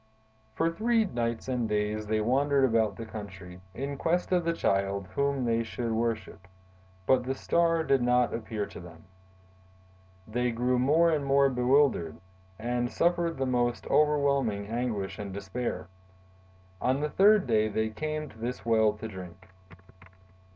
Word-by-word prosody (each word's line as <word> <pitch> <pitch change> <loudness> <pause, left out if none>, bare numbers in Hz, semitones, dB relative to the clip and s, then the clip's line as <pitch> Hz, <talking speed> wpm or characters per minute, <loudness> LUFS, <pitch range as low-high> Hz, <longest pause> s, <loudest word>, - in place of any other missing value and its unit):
"For 165 +1 +1
three 225 +5 +1
nights 120 - -3
and 125 -4 -1
days 105 0 -1
they 110 0 +1
wandered 135 +4 +2
about 115 -3 +1
the 115 - -7
country, 95 -4 -9
in 140 +2 -4
quest 175 +5 0
of 180 -1 +2
the 170 - +1
Child 100 - 0
whom 140 0 0
they 115 0 +1
would 120 -2 -1
worship; 110 -4 -3 0.6
but 130 +2 +3
the 130 +1 -2
Star 165 +3 +1
did 135 -4 +2
not 125 0 +2
appear 110 -2 -3
to - - -11
them. 85 -2 -13 1.2
They 125 +3 0
grew 125 +2 0
more 160 +6 +4
and 150 -3 0
more 140 0 +4
bewildered, 125 - +2 0.4
and 120 +1 -2
suffered 170 +4 +1
the 135 - -1
most 120 -1 0
overwhelming 140 -8 +2
anguish 110 -3 -3
and 100 -1 -5
despair. 100 +4 -4 0.9
On 130 +2 +1
the 150 +1 -1
third 205 +1 +5
day 110 -3 +2
they 110 +1 -1
came 155 +6 -4
to 110 -5 -16
this 120 +1 -5
well 110 -2 +3
to 105 +1 -7
drink. 95 -2 -10
120 Hz, 150 wpm, -28 LUFS, 110-140 Hz, 1.2 s, third